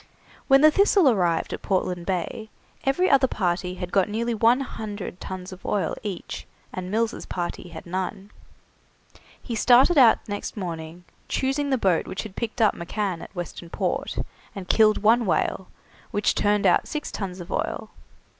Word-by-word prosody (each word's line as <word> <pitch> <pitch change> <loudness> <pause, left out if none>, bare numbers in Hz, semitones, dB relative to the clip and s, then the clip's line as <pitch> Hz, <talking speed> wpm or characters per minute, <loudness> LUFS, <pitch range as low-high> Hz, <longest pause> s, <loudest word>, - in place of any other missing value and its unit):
When 270 0 +6
the 310 0 +8
'Thistle' 390 -5 +5
arrived 175 -6 0
at - - -5
Portland 180 -2 -1
Bay 195 +4 -3 0.4
every 315 +8 +2
other 275 -5 +5
party 180 -3 -1
had 180 -1 -6
got 195 0 +2
nearly 235 +3 -1
one 230 +4 +4
hundred 210 -7 -6
tuns 185 0 -6
of 185 - -11
oil 205 - 0
each, 195 -5 -6 0.3
and 185 0 -5
Mills' 225 +3 -1
party 175 0 -4
had 170 - -9
none. 190 +3 -4 1.1
He 240 - -6
started 255 +8 +5
out 240 -4 +5
next 205 +1 -5
morning, 170 -2 -6 0.2
choosing 275 +2 0
the 265 - +2
boat 190 -7 +1
which 185 - -4
had 210 -3 -10
picked 235 0 -1
up 210 - +4
McCann 180 0 -3
at - - -11
Western 175 -1 -6
Port, - - -2 0.4
and 190 -2 -7
killed 215 0 +4
one 230 +1 +4
whale, 185 +1 0 0.4
which 205 - +1
turned 205 0 +1
out - - +4
six 300 -1 -4
tuns 190 -2 -5
of 175 - -9
oil. - - -3
205 Hz, 165 wpm, -25 LUFS, 180-235 Hz, 1.1 s, the